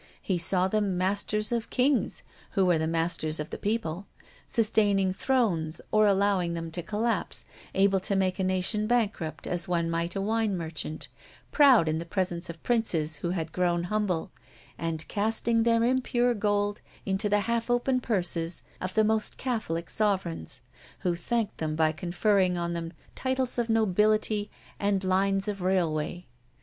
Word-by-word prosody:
He 185 -3 -1
saw 180 +2 +4
them 200 -2 0
masters 205 +3 0
of 235 -2 -1
kings, 260 +1 +1 0.3
who 195 -3 +3
are 165 - +2
the 160 - 0
masters 165 -1 0
of 150 - -5
the - - -4
people 200 -4 -2 0.4
sustaining 205 -4 +2
thrones 190 -9 0
or 215 0 +5
allowing 195 -3 +2
them 165 -1 -5
to 175 - -3
collapse, 215 +3 -1 0.3
able 195 0 +4
to 195 +2 0
make 190 -1 0
a - - +1
nation 185 +3 +1
bankrupt 200 -11 -1
as 175 -1 -2
one 170 -2 0
might 170 +2 -2
a - - -1
wine 215 -1 0
merchant, 160 -2 -4 0.4
proud 265 - +6
in 155 +1 0
the 170 - -5
presence 175 -2 -1
of 170 -1 -9
princes 165 -11 +1
who 170 - -3
had 165 -3 -3
grown 175 -1 +1
humble, 195 -6 -1 0.4
and 165 -1 -4
casting 225 +2 +1
their 230 0 +3
impure 245 0 +2
gold 205 -1 0 0.2
into 195 +2 0
the 205 0 +3
half 230 +2 -1
open 245 +1 +2
purses 175 -6 -1 0.2
of 185 0 -4
the 220 - +5
most 220 0 0
Catholic 195 -10 -2
sovereigns, 190 - -1 0.4
who 175 -2 0
thanked 220 +5 -2
them 155 -1 -2
by 155 0 +3
conferring 180 +3 +1
on 170 0 -2
them 165 -1 -4 0.2
titles 260 -1 -1
of 235 -1 -1
nobility 215 0 +2 0.3
and 200 -1 +1
lines 195 +1 +1
of 200 -2 -3
railway. 175 -2 0
195 Hz, 160 wpm, -28 LUFS, 170-215 Hz, 0.4 s, proud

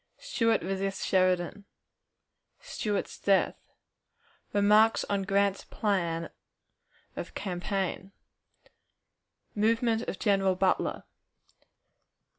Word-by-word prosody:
Stuart 230 - 0
resists 195 +1 -2
Sheridan. 185 +1 +1 0.9
Stuart's 205 -2 -3
Death. 195 -1 +3 1.0
Remarks 210 +2 +4
on 200 -1 +1
Grant's 195 0 +1
Plan 170 -6 -1 0.8
of - - -7
Campaign. 190 +1 -3 1.4
Movement 225 +1 +1
of - - -4
General 195 -2 +2
Butler. 185 0 0
195 Hz, 75 wpm, -29 LUFS, 190-210 Hz, 1.4 s, Remarks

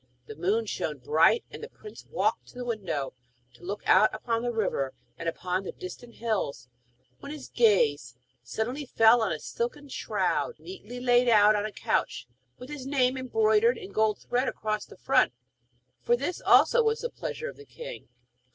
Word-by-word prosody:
The 440 - -9
moon 420 +5 0
shone - - -3
bright, 460 +1 +3
and - - -9
the 455 - -7
prince 425 -3 -13
walked - - 0
to - - -17
the 250 0 -5
window 190 - -3 0.4
to 120 - -20
look 200 +3 -5
out 210 +3 +6
upon 230 +1 -1
the 240 0 -1
river 195 - -1 0.2
and 165 - -2
upon 180 +2 -2
the - - -5
distant 235 +6 -9
hills, 195 - -2 0.5
when 280 - -8
his 300 -3 -8
gaze 145 - +2 0.3
suddenly 245 - -4
fell 225 0 +5
on 220 - 0
a 155 - -1
silken 275 - -4
shroud 465 - -1
neatly 245 - -9
laid 245 0 +4
out 210 -1 +6
on 210 0 0
a - - -8
couch, 130 - -1 0.3
with 250 - -10
his 275 -3 -6
name 260 -2 +2
embroidered 435 - +2
in 385 -3 -9
gold 220 -1 +2
thread 250 +2 -1
across 215 -1 -2
the - - -15
front; - - +3 0.7
for 480 - +3
this 365 -7 -3
also 485 - +5
was 445 0 +1
the 480 - -2
pleasure 470 - -5
of - - -8
the 430 - -12
king. - - -9
245 Hz, 180 wpm, -28 LUFS, -, 0.7 s, out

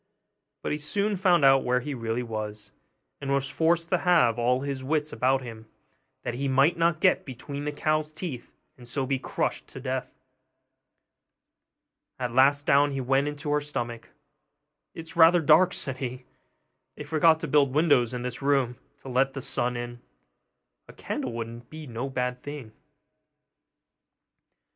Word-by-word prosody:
But - - -2
he 150 - -1
soon 200 +7 -1
found 175 -5 +3
out 135 0 +6
where 125 0 +1
he 145 +3 -4
really 115 -1 -2
was; 110 -2 -6 0.5
and 140 -1 -3
was 140 0 +1
forced 165 +1 +1
to 185 - +2
have 125 - +3
all 125 +2 +2
his 140 -2 -4
wits 150 +2 -1
about 130 +1 +1
him, 110 -2 -10 0.6
that - - -3
he 135 +3 -2
might 135 +5 +3
not 170 -1 +1
get 185 +1 +3
between 140 +2 -7
the 150 - -1
cow's 155 +1 -1
teeth, 155 -6 -7 0.2
and 120 - -13
so 130 +2 -2
be 135 0 -1
crushed - - -3
to - - -10
death. - - -3 2.1
At 125 -2 -3
last 140 +3 +4
down 145 +1 +4
he 135 - -2
went 135 +2 +1
into 145 0 -4
her 150 0 +2
stomach. 120 -5 -5 0.9
'It - - -6
is 165 0 -9
rather 170 +1 +7
dark,' 165 +4 +5
said 135 -1 -3
he; 125 -1 -5 0.7
'they - - -7
forgot 160 0 +3
to 165 - -3
build 140 -1 +3
windows 145 -7 +3
in 125 -1 -4
this 125 +1 -5
room 135 -4 +1 0.2
to - - -12
let 135 +1 +1
the 135 - -5
sun 125 -1 -1
in; 120 0 -6 0.9
a - - -13
candle 125 - -4
would 115 +1 -7
be 155 0 -9
no 125 +1 -5
bad 125 -1 -2
thing. 145 -6 -8
135 Hz, 165 wpm, -27 LUFS, 125-150 Hz, 2.1 s, rather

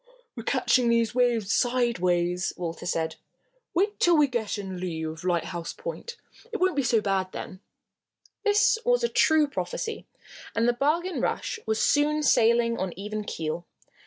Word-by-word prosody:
"We're 235 - -5
catching 250 0 +2
these 230 0 +2
waves 235 -5 +2
sideways," 180 -8 +1
Walter 170 0 -5
said. 160 -2 -1 0.6
"Wait 405 +4 +1
till 345 -2 +4
we 300 - +6
get 235 -6 -2
in 195 -2 -5
the 180 - -6
lea 165 -3 -3
of 160 +1 -6
Lighthouse 175 -1 -2
Point. 475 0 -7 0.3
It 445 - -2
won't 370 -2 +1
be 285 - +2
so 235 -3 +2
bad 190 -2 -1
then." 185 - -7 0.8
This 445 +3 +3
was - - +2
a - - +4
true 315 -2 +4
prophecy, 450 - -4 0.5
and 230 +1 +2
the 240 - +4
Bargain 325 +8 0
Rush 460 - -2
was 220 0 0
soon 300 +1 +2
sailing 235 -2 +3
on 190 -2 -2
even 210 +2 -4
keel. 165 -3 -4
235 Hz, 160 wpm, -26 LUFS, 185-305 Hz, 0.8 s, we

